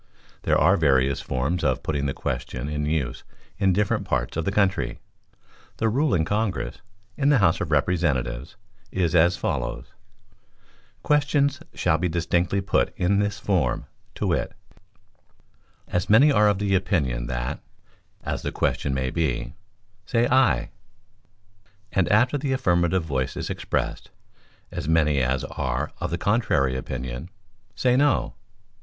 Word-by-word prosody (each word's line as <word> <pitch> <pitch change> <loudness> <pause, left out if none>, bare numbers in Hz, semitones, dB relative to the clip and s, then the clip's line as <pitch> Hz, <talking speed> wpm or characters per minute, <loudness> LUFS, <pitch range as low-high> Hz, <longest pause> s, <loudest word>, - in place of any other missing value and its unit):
There - - +2
are - - +4
various 70 -3 +2
forms 70 +8 -1
for 65 -4 +2
putting 70 0 -2
the 70 - -2
question, 65 +2 -4
in 75 0 -2
use 75 -5 -2 0.4
in 95 -2 +3
different 100 +2 +1
parts 65 -1 -2
of 80 0 -2
the - - 0
country. 95 -12 +1 0.8
The 110 - +1
rule 135 +4 +2
in 80 -3 +1
Congress, 105 +1 -2 0.4
in 140 0 +2
the 145 - +5
House 95 -5 +3
of 85 - -2
Representatives, 70 -5 0 0.4
is 90 -3 0
as 85 +1 +4
follows: - - -3 1.2
"Questions 145 -1 +2 0.2
shall 80 - +1
be 90 +1 0
distinctly 85 +3 0
put 95 - 0
in 100 +3 +2
this 105 -1 0
form, 90 -11 0 0.3
to - - -3
wit: - - 0 1.3
'As 90 0 -2
many 120 +8 +7
as - - +2
are 105 0 +5
of 100 - +1
the 100 0 0
opinion 75 -11 0
that - - -3 0.6
(as - - -3
the - - -3
question 70 -1 -1
may 65 -1 -1
be) 80 -6 -1 0.5
say 120 0 +2
Aye;' 130 0 +3 1.2
and 95 -2 +1
after 125 +7 +3
the 135 -1 -1
affirmative 90 -7 +2
voice 65 -5 -2
is - - -3
expressed, - - -3 0.6
'As - - -5
many 75 -4 +3
as 65 +1 0
are 65 -3 -3
of - - -2
the 85 - -2
contrary 85 - +1
opinion, 65 +3 -5 0.5
say 125 -1 +2
No. 145 +1 +2
85 Hz, 145 wpm, -24 LUFS, 70-105 Hz, 1.3 s, many